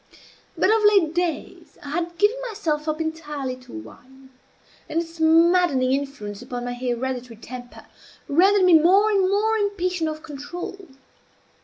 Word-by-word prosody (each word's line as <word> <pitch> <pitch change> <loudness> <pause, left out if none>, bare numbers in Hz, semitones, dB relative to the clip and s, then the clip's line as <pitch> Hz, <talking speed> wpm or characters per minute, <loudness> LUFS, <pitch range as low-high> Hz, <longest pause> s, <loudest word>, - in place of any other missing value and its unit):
But, 395 - +3
of 445 -1 +3
late 395 -7 +4
days, 345 -3 -4
I 285 - -7
had 340 +2 -3
given 415 +6 +3
myself 320 -8 -2
up 310 0 -1
entirely 300 -5 -4
to 255 - -16
wine; 260 - -13 0.6
and 325 - 0
its 335 0 -7
maddening 325 -4 +4
influence 265 -7 -4
upon 245 -1 -6
my 245 - -3
hereditary 250 0 -4
temper 245 +2 -10 0.4
rendered 380 +6 +4
me 360 - +5
more 390 +7 +4
and 385 -2 +2
more 435 +3 +1
impatient 365 -5 -1
of 310 0 -7
control. 345 +5 -8
320 Hz, 145 wpm, -23 LUFS, 260-365 Hz, 0.6 s, me